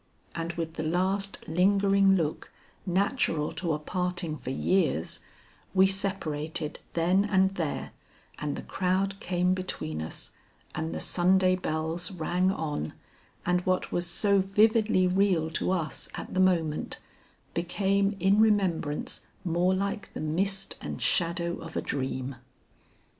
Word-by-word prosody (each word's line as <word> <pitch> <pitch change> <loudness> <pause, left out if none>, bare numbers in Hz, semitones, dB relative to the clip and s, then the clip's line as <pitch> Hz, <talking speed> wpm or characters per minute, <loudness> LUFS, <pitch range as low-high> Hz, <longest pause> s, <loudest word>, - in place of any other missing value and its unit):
And 170 0 -3
with 165 -1 -4
the 160 - -4
last 190 +4 -1
lingering 195 +3 +4
look 155 -4 -2 0.4
natural 180 - +1
to 165 -1 -2
a - - 0
parting 180 +1 -2
for 135 - -7
years, 135 - +1 0.6
we 190 0 +7
separated 165 -6 -1
then 180 +4 +3
and 190 -2 +3
there, 165 -6 -3 0.5
and 150 -1 -2
the - - -6
crowd 190 +1 0
came 180 0 +1
between 130 - -4
us, 80 - -6 0.4
and 160 +1 -3
the - - -3
Sunday 185 +1 +3
bells 160 0 -1
rang 180 +1 +1
on, 150 - -3 0.5
and 180 0 +2
what 185 0 0
was 175 0 0
so 200 +3 +4
vividly 210 0 +3
real 180 -3 +2
to - - -1
us 175 -4 -2
at - - -7
the 185 - 0
moment, 170 -5 +1 0.6
became 195 +3 +1
in 195 +3 +4
remembrance 185 -9 +1 0.2
more 175 +2 +2
like 200 +1 -3
the - - -4
mist 190 +5 -1
and - - -5
shadow 170 0 +1
of 165 -1 -7
a - - +3
dream. 130 -1 -3
180 Hz, 135 wpm, -28 LUFS, 160-195 Hz, 0.6 s, we